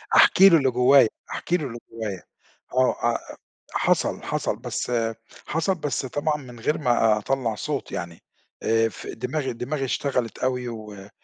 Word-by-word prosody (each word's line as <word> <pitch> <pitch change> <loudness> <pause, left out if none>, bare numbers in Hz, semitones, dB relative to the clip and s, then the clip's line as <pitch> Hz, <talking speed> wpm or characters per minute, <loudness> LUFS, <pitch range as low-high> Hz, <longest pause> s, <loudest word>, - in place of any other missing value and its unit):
أحكي 195 +1 +8
له 165 - +7
اللي 135 -3 +2
جوايّا، 125 -1 +6 0.2
أحكي 175 - 0
له 150 -4 -4
اللي 120 0 -7
جوايّا، 105 -5 -5 0.5
آه، 130 0 +3 0.2
آآ - - -7 0.4
حصَل، - - +1
حصَل، - - -1
بس - - -4 0.6
حصَل 165 +4 0
بس 145 -5 -2
طبعًا 150 +3 -1
من 125 -4 -11
غير 150 +7 0
ما 115 -6 +3
أطلّع 115 0 -1
صوت 145 +5 -4
يعني، 85 -1 -6 0.4
آآ 115 0 +3
في - - -8
دماغي 130 +3 -2
دماغي 135 +4 -3
اشتغلِت 125 -3 -1
أوي 125 -1 -1
و 105 -3 -9
125 Hz, 155 wpm, -24 LUFS, 115-145 Hz, 0.6 s, أحكي